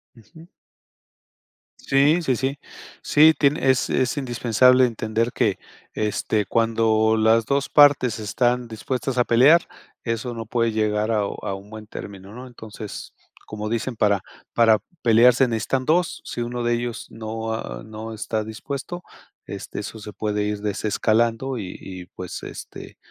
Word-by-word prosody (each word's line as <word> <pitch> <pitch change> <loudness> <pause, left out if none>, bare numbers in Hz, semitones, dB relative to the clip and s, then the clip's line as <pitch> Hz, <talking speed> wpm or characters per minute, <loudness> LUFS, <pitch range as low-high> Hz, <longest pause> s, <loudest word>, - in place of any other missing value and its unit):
Ujú. 140 - -16 1.3
Sí, 145 +5 +3
sí, 130 -6 +1
sí. 135 +3 -2 0.4
Sí, 155 +2 +6
tiene 140 -1 +2
es 130 -1 +2
es 130 +1 0
indispensable 125 0 +4
entender 115 0 -1
que, 100 -4 0 0.3
este, 105 0 -1
cuando 110 -1 +2
las 110 +1 +3
2 140 +3 0
partes 140 -6 +5
están 120 +3 0
dispuestas 125 +3 -4
a 125 - +5
pelear, 140 +8 +5 0.4
eso 115 +1 -3
no 115 -1 -6
puede 115 +1 0
llegar 110 0 0
a 110 - +2
a 100 -1 -4
un 100 +1 -12
buen 110 -1 -10
término, 100 -1 -9
¿no?, 125 +2 -9
entonces, 110 -3 -9 0.3
como 105 0 -5
dicen: 115 +2 -2
"Para 100 -3 +2 0.3
para 115 -2 +5 0.2
pelear 120 +2 +6
se 130 +1 +3
necesitan 125 +3 -1
2". 170 +2 +1
Si 120 - -5
1 120 0 -3
de 120 0 +1
ellos 120 0 -3
no, 110 0 -5
ah, - - -5
no 110 +1 -8
está 110 0 -3
dispuesto, 140 +10 -6 0.4
este, - - -7
eso 110 +2 -8
se 105 0 -9
puede 105 -1 -2
ir 105 0 -2
desescalando 115 +4 0
y 95 -5 -6
y, 90 -2 -9
pues, 90 -1 -7
este, - - -9
115 Hz, 150 wpm, -23 LUFS, 110-125 Hz, 1.3 s, Sí